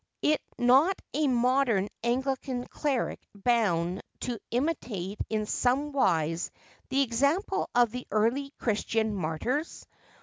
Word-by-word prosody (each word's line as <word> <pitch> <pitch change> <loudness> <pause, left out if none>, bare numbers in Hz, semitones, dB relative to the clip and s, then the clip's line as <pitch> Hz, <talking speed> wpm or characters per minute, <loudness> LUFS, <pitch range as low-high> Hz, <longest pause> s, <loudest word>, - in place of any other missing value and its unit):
Is 305 0 +4 0.2
not 270 +10 +4
a 300 +1 +2
modern 250 -5 +2 0.2
Anglican 255 +1 -1
cleric 280 -5 -1 0.2
bound 195 -6 +1 0.2
to 240 -3 -3
imitate 235 - -2
in 215 -1 0
somewise 230 - +1 0.4
the 275 +1 +3
example 280 - +1
of 240 -2 +5
the 250 +1 -6
early 235 +6 +1
Christian 220 0 0
martyrs 200 - -2
245 Hz, 105 wpm, -28 LUFS, 210-275 Hz, 0.4 s, of